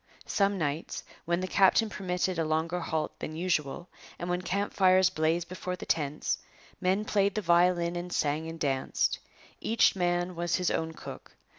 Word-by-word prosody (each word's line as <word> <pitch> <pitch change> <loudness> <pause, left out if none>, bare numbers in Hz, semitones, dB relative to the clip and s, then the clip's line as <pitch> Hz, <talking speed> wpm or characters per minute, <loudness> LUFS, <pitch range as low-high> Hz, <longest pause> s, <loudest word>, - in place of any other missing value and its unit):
Some 200 0 +1
nights, 155 -1 -2 0.2
when 170 +1 0
the 185 - -2
captain 195 +4 +4
permitted 180 -3 -2
a - - +2
longer 160 +3 0
halt 160 -2 -3
than 155 - -5
usual 170 -1 -1 0.3
and 175 +1 -3
when 180 0 0
camp 200 +3 -2
fires 185 -1 +5
blazed 165 0 0
before 180 0 -4
the - - -8
tents, 150 -2 -1 0.4
men 190 +3 +1
played 200 -2 +2
the 215 - 0
violin 175 0 +3
and 175 +1 -4
sang 150 +1 0
and 165 0 -8
danced. 135 -3 0 0.4
Each 225 -2 +3
man 175 0 0
was 170 0 0
his 180 -1 +1
own 160 0 -1
cook. - - -10
175 Hz, 170 wpm, -29 LUFS, 160-185 Hz, 0.4 s, fires